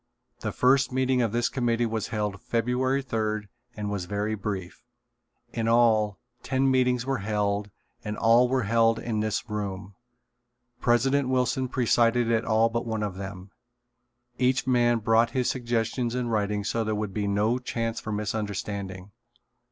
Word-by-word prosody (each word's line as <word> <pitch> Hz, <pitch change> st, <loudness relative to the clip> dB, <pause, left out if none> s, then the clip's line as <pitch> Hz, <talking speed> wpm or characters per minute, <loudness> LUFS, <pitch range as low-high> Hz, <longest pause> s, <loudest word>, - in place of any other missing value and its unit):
The 110 Hz, -, -3 dB
first 135 Hz, +5 st, +3 dB
meeting 130 Hz, 0 st, +1 dB
of 115 Hz, -3 st, +1 dB
this 120 Hz, +1 st, +1 dB
committee 120 Hz, -2 st, 0 dB
was 110 Hz, -2 st, -2 dB
held 105 Hz, -2 st, -3 dB
February 125 Hz, +4 st, 0 dB
third 110 Hz, -4 st, -2 dB, 0.3 s
and 105 Hz, -1 st, -3 dB
was 100 Hz, -3 st, -3 dB
very 105 Hz, +3 st, -2 dB
brief. 100 Hz, -4 st, -5 dB, 0.7 s
In 115 Hz, -1 st, -1 dB
all, 110 Hz, -3 st, +3 dB, 0.2 s
ten 135 Hz, 0 st, +1 dB
meetings 125 Hz, -2 st, +2 dB
were 135 Hz, -2 st, -1 dB
held 105 Hz, 0 st, -1 dB, 0.3 s
and 105 Hz, 0 st, -4 dB
all 120 Hz, +2 st, +4 dB
were 130 Hz, -1 st, +1 dB
held 115 Hz, +1 st, +3 dB
in 110 Hz, -2 st, -2 dB
this 110 Hz, +2 st, -1 dB
room. 100 Hz, -2 st, -4 dB, 0.9 s
President 130 Hz, +3 st, +2 dB
Wilson 130 Hz, 0 st, +1 dB
presided 120 Hz, -1 st, +2 dB
at 115 Hz, 0 st, +1 dB
all 110 Hz, +1 st, +3 dB
but 115 Hz, +1 st, -3 dB
one 110 Hz, -1 st, -2 dB
of 105 Hz, -2 st, -2 dB
them. 95 Hz, 0 st, -8 dB, 0.9 s
Each 130 Hz, 0 st, +2 dB
man 120 Hz, -2 st, +3 dB
brought 115 Hz, +1 st, +3 dB
his 125 Hz, -, +2 dB
suggestions 120 Hz, 0 st, -1 dB
in 125 Hz, -1 st, -1 dB
writing 105 Hz, -2 st, 0 dB
so 115 Hz, +3 st, -1 dB
there 110 Hz, 0 st, -1 dB
would 105 Hz, -2 st, -3 dB
be 105 Hz, 0 st, -1 dB
no 105 Hz, +5 st, +1 dB
chance 115 Hz, -2 st, -3 dB
for 110 Hz, -, -6 dB
misunderstanding. 100 Hz, -2 st, -4 dB
115 Hz, 155 wpm, -26 LUFS, 105-125 Hz, 0.9 s, all